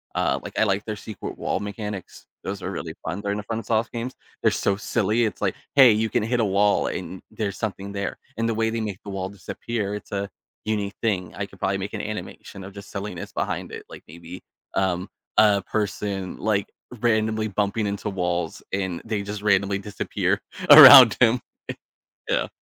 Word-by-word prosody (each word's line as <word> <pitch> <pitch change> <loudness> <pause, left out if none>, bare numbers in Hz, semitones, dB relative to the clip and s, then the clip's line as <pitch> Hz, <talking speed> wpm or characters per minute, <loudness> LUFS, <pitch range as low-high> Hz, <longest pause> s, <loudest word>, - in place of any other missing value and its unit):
Uh, - - +1
like, - - -8
I - - +5
like 100 -1 +1
their 110 -1 -3
secret 105 -1 -8
wall - - -1
mechanics. 105 -1 -6 0.2
Those 100 0 -5
are 90 - -3
really 80 -2 -6
fun, 90 +5 -3
they're 100 - -3
in 105 - -2
the 105 - -5
FromSoft 115 0 -1
games. 120 +2 -5 0.3
They're - - +4
so 100 - 0
silly, 110 +2 +1
It's, 110 - -4
like, 100 -3 0 0.2
"Hey, 130 -4 +9
you 110 +1 0
can 120 -3 0
hit 120 +2 0
a 110 - +2
wall, 100 +1 +2
and 95 - -5
there's 105 -2 -3
something 100 -2 -4
there." 100 0 -3 0.2
And 115 0 0
the 115 - -1
way 110 0 +1
they 115 -1 -2
make 100 -3 -5
the 100 - -7
wall 95 -1 -3
disappear, 100 +1 -4
it's 105 - -9
a 100 0 -2 0.4
unique 105 -2 -2
thing. 90 -6 -1
I - - -3
could - - -17
probably - - 0
make - - -5
an - - -3
animation 95 - -7
of 95 +1 -10
just 100 0 -11
silliness 100 -3 -6
behind - - -3
it, - - -8
like, - - -11
maybe, 85 +3 -10 0.3
um, 95 -1 0 0.3
a 105 -2 +5
person, 100 -3 -3
like, 105 -2 0 0.3
randomly 110 -1 +1
bumping 105 +1 -1
into 100 +1 -4
walls, 90 -3 -2
and 95 -3 -2
they 110 -3 -2
just 105 0 -6
randomly 100 -1 +2
disappear 100 -1 -1 0.3
around 135 -6 +12
him. 120 0 +4 0.9
Yeah. - - +1
100 Hz, 195 wpm, -24 LUFS, 95-110 Hz, 0.9 s, around